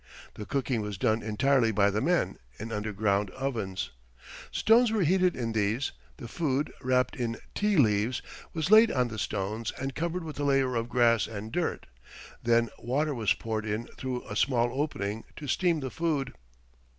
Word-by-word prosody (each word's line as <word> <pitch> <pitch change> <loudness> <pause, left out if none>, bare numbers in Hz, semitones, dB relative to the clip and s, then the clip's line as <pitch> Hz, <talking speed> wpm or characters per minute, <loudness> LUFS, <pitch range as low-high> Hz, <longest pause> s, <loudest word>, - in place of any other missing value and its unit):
The 105 - -8
cooking 130 -4 0
was 105 -2 -4
done 110 +2 +1
entirely 115 +2 +2
by 100 -1 +3
the 105 +2 -1
men, 175 +6 +1 0.2
in 115 +2 -6
underground 105 -1 0
ovens. 110 -7 -3 0.6
Stones 230 +1 +4
were 215 -4 +2
heated 180 +2 +3
in 115 -2 -2
these; 110 +5 0 0.3
the 120 - -8
food, 145 +1 -1
wrapped 125 0 +1
in 115 -2 -2 0.2
ti 210 -2 +1
leaves, 110 -1 +2 0.3
was 165 +3 -2
laid 220 +1 +8
on 125 -2 +1
the 110 -1 -6
stones 105 +3 -2
and 135 +1 -3
covered 170 +4 -2
with 155 -3 -7
a - - -1
layer 135 -2 +2
of 115 0 -1
grass 120 -3 +3
and 110 0 -7
dirt; 175 +5 -2 0.6
then 115 -1 +3
water 145 +5 0
was 115 -5 +1
poured 110 -1 -3
in 110 +2 -2
through 130 -2 -5
a 105 - -5
small 120 0 +2
opening 115 -7 -2
to 150 - -8
steam 170 0 +1
the 130 -2 -4
food. 155 -5 -1
120 Hz, 175 wpm, -29 LUFS, 110-145 Hz, 0.6 s, laid